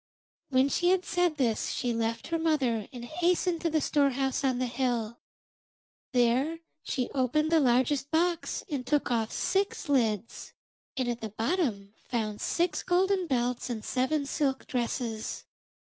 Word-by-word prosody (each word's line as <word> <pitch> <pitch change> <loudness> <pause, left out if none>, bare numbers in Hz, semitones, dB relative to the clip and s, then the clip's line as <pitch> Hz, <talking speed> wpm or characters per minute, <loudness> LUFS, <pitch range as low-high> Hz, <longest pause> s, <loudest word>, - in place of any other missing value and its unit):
When 260 0 +4
she 350 +5 +2
had 370 0 +2
said 355 -4 +1
this 235 -6 +1
she 245 -1 -1
left 230 +3 -2
her 330 0 0
mother 265 -10 +1
and 245 -3 -7
hastened 345 +3 +1
to 335 - +1
the 315 -1 +1
storehouse 275 -2 +1
on 260 -2 +2
the 255 - 0
hill. 240 -2 -1 0.9
There 260 +6 +2 0.2
she 250 -2 -2
opened 285 +4 +1
the 325 - +5
largest 260 +2 +2
box 340 +2 0
and 280 -5 -3
took 290 0 0
off 225 -2 0
six 390 -3 -1
lids, 230 -5 0 0.4
and 255 -2 0
at 240 -1 -2
the 220 - -4
bottom 220 - -1
found 215 -3 -3
six 340 -3 0
golden 375 0 +2
belts 250 -3 -1
and 225 -3 -4
seven 280 +3 0
silk 275 -1 -1
dresses. 235 -3 -3
265 Hz, 150 wpm, -29 LUFS, 240-320 Hz, 0.9 s, the